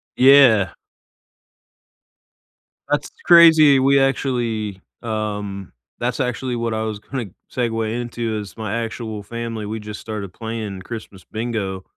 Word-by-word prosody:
Yeah. 125 - +6 2.2
That's - - 0 0.2
crazy. 160 -5 +8
We 135 +1 +4
actually, 115 -7 -1 0.2
um 105 -4 -4 0.3
that's 125 +3 -2
actually 125 0 -2
what 115 -1 -2
I 110 0 -1
was 110 -2 -4
gonna 120 -1 -5 0.2
segue 115 -3 -1
into 115 -2 -3
is 105 0 -9
my 110 +1 -2
actual 110 -2 -6
family, 115 0 -5
we 110 +2 -4
just 105 -1 -8
started 105 -4 -6
playing 110 -4 -5
Christmas 105 -2 -9
bingo. 110 -5 -4
115 Hz, 120 wpm, -21 LUFS, 105-120 Hz, 2.2 s, crazy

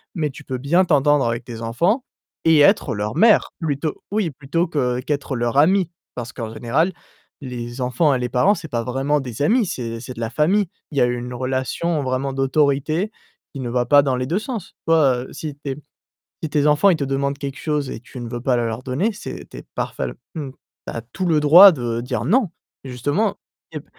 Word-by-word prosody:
mais 155 -4 0
tu 135 - -11
peux 130 -1 -4
bien 155 +8 +3
t'entendre 145 -3 +3
avec 115 +1 -2
tes 115 -1 -8
enfants 170 - +1 0.4
et 160 -2 +6
être 145 - +4
leur 105 +2 -3
mère, 220 0 +5
plutôt 150 -1 -2
oui, 205 -5 0
plutôt 150 +5 -1
que 125 -6 0
qu'être 140 0 -2
leur 120 +1 -1
amie. 180 +4 +4 0.3
Parce 120 +1 -6
qu'en 115 -3 -5
général, 145 +12 +1 0.5
les 120 -1 -6
enfants 125 +4 +2
et 130 - 0
les 125 0 -2
parents 130 - +3
c'est 160 - -8
pas 115 -3 -1
vraiment 135 +4 0
des 125 -1 -6
amis, 225 - +3
c'est 115 -6 -4
c'est 125 +2 -8
de - - -9
la 115 - -1
famille. 185 - +2 0.2
Il 145 - -6
y - - +4
a - - +6
une 120 0 -3
relation 130 +6 -1
vraiment 130 +1 -1
d'autorité 145 +7 +1 0.4
qui 140 - -7
ne 120 - -3
va 120 0 0
pas 145 +3 +6
dans 135 -2 0
les 125 0 -2
2 175 +8 0
sens. 220 -4 -6
Toi, 150 -6 +4
heu, - - -13
si 150 -3 -6
tes 140 -2 -5 0.7
si 160 - -2
tes 145 -1 +2
enfants 150 +6 +4
ils 175 - +3
te 145 - -2
demandent 140 +1 -1
quelque 140 -1 -5
chose 150 -3 -1
et - - -5
que - - -34
tu - - -8
ne 120 - -5
veux 120 0 -4
pas 125 0 +1
le 120 - 0
leur 115 +2 -4
donner, 145 - -1
c'est 210 - -8
tu - - -9
es - - -10
parfèl - - -3 0.2
mmh, 145 -4 -4
tu - - -31 0.4
as 115 - -4
tout 185 - -2
le 160 -3 +3
droit 175 +7 +10
de 120 -5 -2
dire: 120 -2 -3
«Non». 210 - +2 0.3
Justement 145 - -1 0.4
ép - - -6
140 Hz, 220 wpm, -21 LUFS, 125-160 Hz, 0.7 s, droit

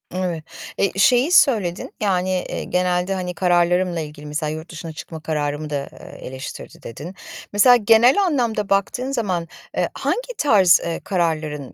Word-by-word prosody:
Evet, 175 -4 -2 0.3
eee, 195 - +1
şeyi 250 - +4
söyledin, 215 - +3
yani, 185 -2 +1 0.2
eee, - - -4
genelde, 180 +1 0
hani, 180 -1 -3
kararlarımla 175 -1 +2
ilgili, 150 -1 -8
mesela 150 +1 -3
yurt 160 +3 -7
dışına 165 0 -7
çıkma 160 +1 -8
kararımı 150 -1 -3
da, 140 -1 -3
eee, - - -11
eleştirdi 130 +1 -9
dedin. 155 - -8 0.4
Mesela 245 +4 +7
genel 235 - +5
anlamda 235 - 0
baktığın 245 +7 0
zaman, 185 -9 -2 0.3
eee, - - +1
hangi - - -2
tarz, 195 - +5
eee, 165 -1 -3
kararların 155 -6 -2
180 Hz, 150 wpm, -21 LUFS, 160-210 Hz, 0.4 s, Mesela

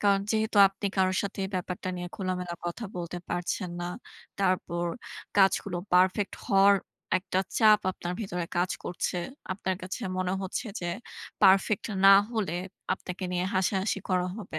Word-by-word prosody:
কারণ 200 -1 +4
যেহেতু 220 0 0
আপনি 195 +1 -5
কারো 185 -1 +3
সাথে 200 0 -5
এই - - -3
ব্যাপারটা 180 0 -3
নিয়ে 175 0 -5
খোলামেলা 180 -3 -3
কথা 175 +7 -4
বলতে 175 0 -4
পারছেন 175 +1 -2
না, - - -2 0.5
তারপর 185 -2 0 0.5
কাজগুলো 195 -1 +3 0.2
পারফেক্ট 185 +2 +3
হওয়ার 200 -2 +6 0.4
একটা 185 0 -2 0.2
চাপ 215 -2 +6
আপনার 175 -1 -5
ভেতরে 180 -5 -3
কাজ 180 +1 +1
করছে। 180 +1 -2 0.4
আপনার 190 0 -2
কাছে 185 +6 -5 0.2
মনে 185 0 0
হচ্ছে 190 +6 -3
যে, 175 - -3 0.6
পারফেক্ট 195 +1 +5 0.2
না 195 - +10 0.2
হলে 215 -7 -1 0.4
আপনাকে 185 0 -7
নিয়ে 180 0 0
হাসাহাসি 190 +2 +1
করা 180 -1 +1
হবে। 205 -7 -6
185 Hz, 150 wpm, -28 LUFS, 180-200 Hz, 0.6 s, না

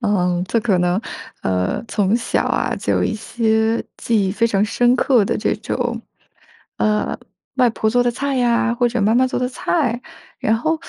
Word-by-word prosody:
嗯， 180 -5 +1
这 230 - +1
可 205 -5 +1
能 180 +2 +1 0.4
呃， 90 - -1
从 205 +1 +1
小 235 - 0
啊， - - 0
就 - - -1
有 - - +1
一 - - -1
些 220 0 0
记 210 -4 +1
忆 - - -1
非 215 +4 +1
常 205 -2 +1
深 240 +4 +2
刻 250 -3 +3
的 - - -1
这 - - 0
种， 240 +2 -3 0.8
呃， 210 0 0 0.4
外 250 -2 +4
婆 220 -1 -1
做 245 +2 +2
的 245 - +1
菜 270 +1 -1
啊， 235 0 +2
或 240 0 +2
者 235 -2 -1
妈 210 +2 +3
妈 255 +2 +4
做 255 - -2
的 250 - 0
菜， 255 -2 -1 0.4
然 220 - +1
后 315 +7 -1
230 Hz, 205 characters per minute, -20 LUFS, 210-245 Hz, 0.8 s, 外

